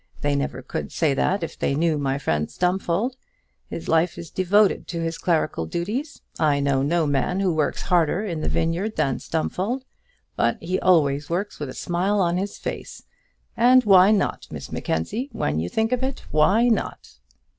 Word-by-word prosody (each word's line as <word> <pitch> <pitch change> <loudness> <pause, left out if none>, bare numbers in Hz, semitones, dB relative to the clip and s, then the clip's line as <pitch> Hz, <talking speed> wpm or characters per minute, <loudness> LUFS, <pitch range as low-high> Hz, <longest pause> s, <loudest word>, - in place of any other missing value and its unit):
They 145 0 +1
never 130 -2 -3
could - - -5
say 155 -4 +1
that 180 +7 0
if 165 - -6
they 140 - 0
knew 160 0 +1
my 135 -1 0
friend 75 - -1
Stumfold. 190 +7 -1 0.5
His 165 - -6
life 165 +1 +2
is 170 - -8
devoted 195 +2 +2
to 170 -1 -4
his 165 0 -3
clerical 155 - 0
duties. 215 - -4 0.2
I 150 -3 +3
know 140 -1 +1
no 160 +4 +1
man 145 +6 0
who 190 -3 +1
works 155 -2 -1
harder 180 +2 +2
in 170 -6 -3
the - - -1
vineyard 175 +7 -1
than 135 -2 0
Stumfold. 200 +10 -2 0.5
But - - +1
he 180 +3 -2
always 145 -5 +2
works 185 +5 -3
with 145 -3 -4
a - - -8
smile 185 +4 0
on 175 -2 +2
his 200 +2 -3
face. - - -6 0.5
And 250 +2 +5
why 190 -2 +7
not, 210 -3 0
Miss - - -8
Mackenzie? 215 - -2
when 75 +2 -1
you 85 +2 -2
think 220 +1 0
of 250 0 0
it, 265 0 -3
why 190 +11 +4
not?" 215 - -2
170 Hz, 180 wpm, -23 LUFS, 145-200 Hz, 0.5 s, why